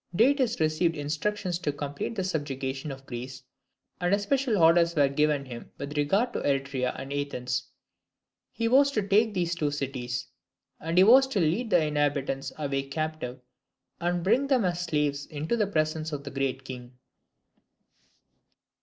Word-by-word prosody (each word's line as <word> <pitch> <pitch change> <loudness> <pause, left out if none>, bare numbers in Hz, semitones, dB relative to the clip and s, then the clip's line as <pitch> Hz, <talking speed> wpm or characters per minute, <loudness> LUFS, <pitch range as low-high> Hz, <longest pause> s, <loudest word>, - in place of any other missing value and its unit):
Datis 250 +2 +3
received 160 +1 +1
instructions 170 +5 -2
to 160 -4 -1
complete 145 +9 -4
the 190 - -1
subjugation 140 -4 -3
of 135 0 -9
Greece, 125 +1 -7 0.6
and 180 +2 +3
especial 235 +3 0
orders 170 0 +5
were 145 -2 +4
given 145 0 +1
him 120 -2 -9
with 140 +1 -6
regard 195 +12 +1
to - - -1
Eretria 135 -2 -1
and 135 +1 -6
Athens. 140 -3 -2 0.9
He 230 0 -1
was 275 +4 +5
to 210 -5 -1
take 210 +1 +3
these 175 -2 0
two 155 -3 0
cities; 130 -4 -3 0.5
and 165 +2 -3
he 185 - +8
was 260 +6 +7
to 255 -7 -1
lead 180 +9 +1
the 175 -5 +4
inhabitants 145 -2 -1
away 140 -2 -1
captive, 155 -4 -4 0.6
and 175 0 -1
bring 240 +9 +3
them 260 -7 +3
as 175 -1 -1
slaves 150 -4 -1
into 155 +7 -2
the 215 -3 +1
presence 155 -3 -1
of 145 -2 -4
the 140 - -7
Great 135 -1 -2
King. 125 -1 -9
155 Hz, 155 wpm, -27 LUFS, 140-190 Hz, 0.9 s, he